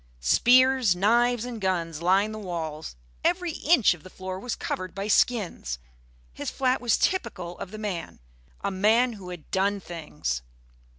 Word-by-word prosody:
Spears, 255 - +5
knives 235 +5 +3
and 240 -3 -6
guns 170 -4 -1
lined 195 +5 +3
the 215 - -6
walls; 160 - -5 0.3
every 355 -1 +1
inch 305 - +4
of 175 - -13
the 185 - -12
floor 185 0 -6
was 245 +3 -3
covered 185 -1 -4
by 200 +1 -3
skins. 200 - +1 0.6
His - - -4
flat 260 -1 0
was 240 -2 +2
typical 200 - -1
of - - -6
the 215 - -8
man 200 -6 -5 0.4
a - - -1
man 220 +6 +3
who 195 -4 -9
had 175 -4 -10
done 200 +2 +1
things. 150 - -4
195 Hz, 160 wpm, -26 LUFS, 175-240 Hz, 0.6 s, Spears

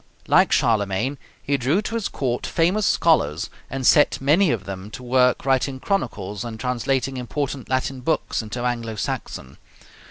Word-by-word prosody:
Like - - +4
Charlemagne 110 +4 +1 0.2
he 140 0 +1
drew 135 +8 +1
to 230 - -5
his 230 -3 -1
court 125 -3 -2
famous 185 +5 +1
scholars, 85 - +2 0.2
and 135 0 -4
set 145 - +5
many 155 +7 +3
of 115 -7 -1
them 95 +1 -7
to 125 - -9
work 125 0 +2
writing 135 0 +1
chronicles 110 - -2
and 115 -2 -7
translating 130 +2 -1
important 130 +2 -4
Latin 130 0 -1
books 160 -1 -1
into 115 +3 -5
Anglo 115 -2 -2
Saxon. 70 -9 -5
125 Hz, 155 wpm, -23 LUFS, 115-140 Hz, 0.2 s, set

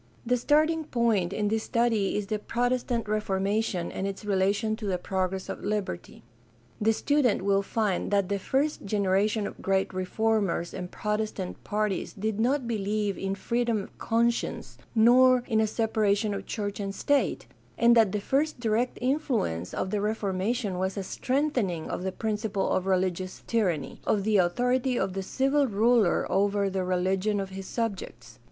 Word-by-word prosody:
— - - -31
The - - +6
starting 310 +5 +2
point 225 -9 +1
in 205 +1 0
this 220 +1 0
study 230 -5 +1
is 210 - -2
the 215 +1 -2
Protestant 245 0 -1
Reformation 200 -2 -1
and 195 - -3
its 195 +1 -6
relation 205 +2 +1
to 215 -3 -5
the 185 -2 0
progress 190 +1 -2
of - - -6
liberty. 205 - -4 0.6
The 220 +1 +4
student 250 -3 +1
will 195 0 +3
find 200 -2 -1
that 200 -2 +2
the 200 0 -1
first 280 +9 0
generation 200 +1 +1
of - - -7
great 190 0 0
reformers 190 -2 0
and 180 -1 -5
Protestant 210 -3 -3
parties 210 -2 -1
did 215 +1 -3
not 255 +2 +1
believe 210 -2 -1
in 195 0 -3
freedom 235 0 0
of - - -14
conscience 235 +1 -1 0.2
nor 250 +2 +6
in 220 -3 +2
a 220 - +2
separation 215 -1 +1
of 200 - -6
church 205 -2 -3
and 195 -1 -4
state, 285 -1 +1 0.3
and 235 0 +5
that 220 -4 +5
the 210 - -1
first 280 +7 0
direct 235 +1 0
influ 260 - 0
ence 85 +2 -7
of 185 - -3
the 210 - 0
Reformation 205 0 -1
was 190 +2 -2
a 195 - -2
strengthening 250 - -1
of - - -3
the 190 +1 -2
principle 210 -1 -2
of 185 0 0
religious 185 -1 -1
tyranny 185 - -1
— - - -24
of 205 -2 +2
the 215 0 +3
authority 245 +8 +1
of 190 - -1
the 195 - -2
civil 270 +7 +1
ruler 225 -2 +3
over 200 0 +1
the 190 -1 -1
religion 190 +3 0
of 195 -1 -4
his 190 0 -7
subjects. 185 - -5
210 Hz, 170 wpm, -27 LUFS, 195-235 Hz, 0.6 s, The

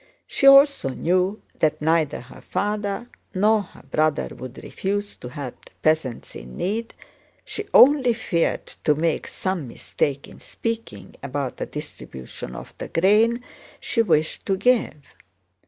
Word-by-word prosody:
She 275 - +2
also 275 - +7
knew 185 +8 0 0.2
that 155 -1 +2
neither 160 -1 +1
her 125 - -14
father 205 +2 -2 0.3
nor 210 +3 +4
her 195 - -14
brother 155 -1 0
would 130 0 -9
refuse 205 +1 -3
to 125 - -8
help 130 -1 -8
the - - -19
peasants 155 -6 0
in 60 +1 -9
need, 225 +5 -2 0.5
she 420 0 -4
only 260 -3 +7
feared 175 -7 0
to 150 - 0
make 160 +1 0
some 185 -7 -3
mistake 140 +3 -2
in - - -14
speaking 230 0 -5
about 140 -1 -3
the - - -4
distribution 65 -1 -8
of - - -9
the - - -5
grain 220 +7 +3 0.4
she 230 - +1
wished 160 -7 +1
to 195 - +1
give. 250 +2 +2
185 Hz, 140 wpm, -23 LUFS, 145-225 Hz, 0.5 s, also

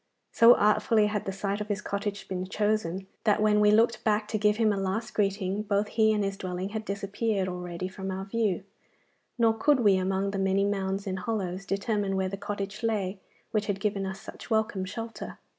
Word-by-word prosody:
So 230 +1 +7
artfully 215 +1 +3
had 210 -1 -1
the 195 - -2
site 200 +1 -2
of 210 - -4
his 205 -2 -1
cottage 200 -1 -4
been 185 -1 -3
chosen, 200 -3 -1 0.2
that 210 -2 +3
when 210 0 +4
we 210 0 +5
looked 225 +2 +3
back 210 -1 +1
to 215 - -1
give 210 0 +3
him 220 -2 +3
a - - -1
last 195 +4 -2
greeting 200 -1 0
both 205 0 0
he 220 -1 +3
and 210 -1 +1
his 195 0 -2
dwelling 185 +1 -4
had 220 +1 -5
disappeared 200 0 -1
already 180 0 -4
from 190 0 -6
our 190 +1 -4
view, 200 -3 0 0.7
nor 230 -2 +4
could 260 +4 +3
we, 200 -4 +5
among 190 +1 0
the 195 - -3
many 195 +1 +2
mounds 195 -1 -1
and 190 -1 -3
hollows, 195 -2 -3
determine 200 -1 0
where 190 0 0
the 195 - -4
cottage 205 +1 -5
lay 205 -4 -1 0.3
which 215 -2 0
had 200 -2 -1
given 195 -1 -1
us 190 0 -5
such - - -11
welcome 220 -4 0
shelter. 225 +4 -6
200 Hz, 205 wpm, -28 LUFS, 190-215 Hz, 0.7 s, So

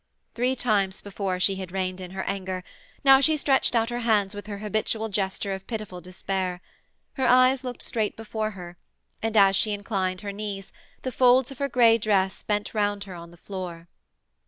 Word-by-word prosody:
Three 250 +2 +1
times 205 -6 +1
before 195 -2 -3
she 190 +1 +2
had 190 -2 -6
reined 185 -1 -2
in 180 - -7
her 190 +1 -4
anger: 190 -2 -3 0.4
now 270 -1 +8
she 310 +3 +3
stretched 270 -3 +2
out 230 +1 +2
her 240 - -2
hands 215 -4 +2
with 205 0 -8
her 205 -1 -5
habitual 215 +1 -1
gesture 195 0 -1
of 190 0 -7
pitiful 215 -6 -5
despair. 185 0 -3 0.5
Her 265 -2 0
eyes 255 +1 +5
looked 250 -2 -5
straight 220 -2 -2
before 220 -1 -3
her, 175 -1 -9 0.4
and, 225 0 0
as 195 -1 +6
she 210 +2 +2
inclined 195 -3 -2
her 205 -1 -4
knees, 200 -1 -6 0.3
the 255 - -2
folds 250 +1 +4
of 270 - -10
her 280 0 0
grey 230 -2 +5
dress 195 -3 +1
bent 210 0 -2
round 205 -2 0
her 195 -2 -9
on 170 -1 -9
the 175 - -16
floor. 175 -3 -7
205 Hz, 190 wpm, -26 LUFS, 190-230 Hz, 0.5 s, now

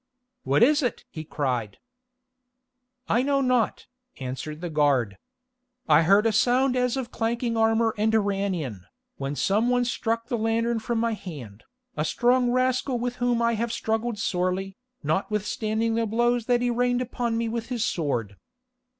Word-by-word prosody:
"What - - +3
is 295 +4 +4
it?" 250 - -2
he 155 - -6
cried. 125 -9 -2 1.3
"I 240 - +2
know 275 +1 +1
not," 255 -4 +1 0.3
answered 135 +4 -5
the 175 0 -4
guard. 140 -9 +1 0.7
"I - - +6
heard 200 +6 +4
a 225 - +4
sound 250 +4 +2
as 250 0 +1
of 255 -3 -4
clanking 230 +1 -1
armour 225 0 +2
and 220 +1 +2
ran 200 -1 0
in, 120 - -6 0.3
when 140 +1 -3
some 210 +9 +1
one 245 0 +2
struck 230 -1 -1
the 240 -4 -2
lantern 225 +1 0
from 230 +1 -2
my 230 0 +1
hand, 135 - -9 0.3
a 150 - -1
strong 245 +8 +2
rascal 255 +1 +1
with 245 +1 -3
whom 245 -1 +1
I 235 0 +2
have 230 +1 -2
struggled 225 0 -2
sorely, 185 0 -1 0.3
notwithstanding 210 +6 -1
the 230 0 0
blows 240 +1 +1
that 245 -1 +3
he 245 - +1
rained 245 +1 +1
upon 235 -2 -2
me 230 0 -1
with 230 0 -3
his 245 -2 -1
sword. 120 - -2
225 Hz, 160 wpm, -25 LUFS, 180-240 Hz, 1.3 s, I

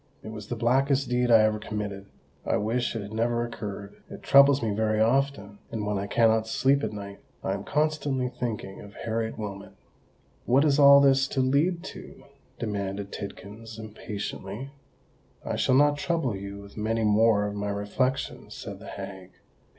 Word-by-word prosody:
"It - - -7
was 105 -2 -8
the 120 - -3
blackest 135 +3 +2
deed 125 0 +1
I 115 -2 +7
ever 110 0 +1
committed—I 100 -2 -5
wish 120 +4 -1
it 110 - -3
had 100 +2 -9
never 120 +1 0
occurred: 100 -3 -7
it - - -10
troubles 140 -1 +6
me 110 - 0
very 110 +1 0
often; 110 -4 +1
and 110 -2 -3
when 105 -1 -1
I 100 - -3
cannot 110 0 +3
sleep 135 +5 +2
at 110 - -1
night, 100 -1 -8 0.2
I - - 0
am - - -4
constantly 150 -4 0
thinking 115 -6 -5
of 100 0 -12
Harriet 115 0 -3
Wilmot." 100 -3 -7 0.7
"What 135 +5 +4
is 145 -1 +3
all 140 0 +9
this 135 -1 +4
to 135 - -1
lead 155 +7 +1
to?" - - -10 0.3
demanded 100 -2 -3
Tidkins, 105 +3 -8
impatiently. 105 +2 -6 0.7
"I - - -2
shall 130 - +2
not 145 +1 +4
trouble 165 - 0
you 100 +1 -7
with 100 +1 -14
many 110 +1 0
more 105 0 +4
of 105 - -3
my 105 0 -3
reflections," 105 +6 -2
said - - -8
the - - -11
hag. 95 -2 -8
110 Hz, 170 wpm, -27 LUFS, 105-130 Hz, 0.7 s, all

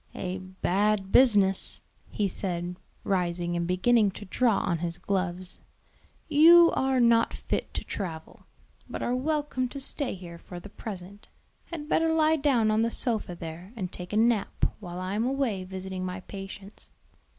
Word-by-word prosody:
"A 185 0 -3
bad 190 +2 0
business," 205 -7 +4 0.3
he 205 - 0
said, 180 -2 -3 0.3
rising 175 -2 0
and 170 0 -1
beginning 210 +4 +3
to 205 +2 -9
draw 225 +2 +2
on 170 -2 0
his 170 0 -3
gloves. 185 -2 -3 0.7
"You 335 +3 +8
are 265 -1 +1
not 235 -1 +4
fit - - -3
to - - -2
travel, 165 -5 -6 0.4
but - - -4
are 240 - 0
welcome 290 -1 -1
to 275 - -7
stay 270 -2 -3
here 170 -2 -10
for 175 +1 -9
the 205 - -11
present; 200 -1 -9 0.4
had 315 -4 -7
better 325 +1 +2
lie 320 0 +3
down 255 -7 +3
on 215 +1 +2
the 230 - +2
sofa 225 -7 -2
there 170 +5 -8
and 190 -5 -4
take 180 0 -8
a 210 - 0
nap 225 -2 +2
while 180 -3 -7
I 185 +1 -3
am 215 +2 0
away 255 -8 -1
visiting 190 0 -5
my 185 0 -4
patients. 195 +1 -9
200 Hz, 160 wpm, -28 LUFS, 180-240 Hz, 0.7 s, You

